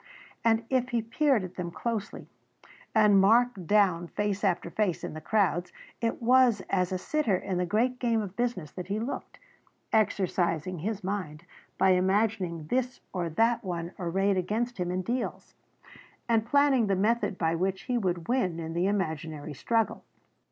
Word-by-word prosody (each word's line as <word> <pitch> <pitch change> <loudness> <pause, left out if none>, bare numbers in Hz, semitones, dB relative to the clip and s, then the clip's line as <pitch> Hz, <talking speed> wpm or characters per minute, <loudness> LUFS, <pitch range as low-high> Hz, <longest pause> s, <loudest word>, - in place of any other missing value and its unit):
And 225 0 +2
if 255 -1 +1
he 235 -3 0
peered 255 -1 +2
at 185 0 -8
them 175 -2 -3
closely 215 +3 -4 0.7
and 210 -3 +6
marked 225 -2 +3
down 190 -5 +3
face 205 +2 -2
after 175 -3 0
face 200 -4 0
in - - -5
the 155 - -7
crowds 180 -5 +1 0.3
it 230 -1 -1
was 245 -3 +5
as 185 -1 +1
a 185 - 0
sitter 230 -1 0
in 180 -1 -3
the 180 - 0
great 245 +6 +1
game 230 -2 +1
of 200 -3 -5
business 235 -11 -2
that 180 -1 -7
he 200 +2 -1
looked, 235 +5 -5 0.6
exercising 185 -5 +1
his 205 +4 -3
mind 180 -5 -4 0.3
by 190 0 +4
imagining 185 -3 +1
this 250 +8 -1
or 175 -2 -2
that 230 +7 +2
one 175 -2 -4
arrayed 190 +3 +1
against 215 +5 -2
him 175 -1 -1
in 185 +1 -2
deals, 245 +5 -3 0.7
and 225 -1 +2
planning 275 -3 +4
the 195 - +2
method 210 0 +1
by 165 -1 +1
which 190 +3 -1
he 250 - -2
would 175 -5 -2
win 190 -10 0
in 165 0 -5
the 175 +3 +1
imaginary 160 -6 -3
struggle. 225 - 0
195 Hz, 165 wpm, -28 LUFS, 180-230 Hz, 0.7 s, and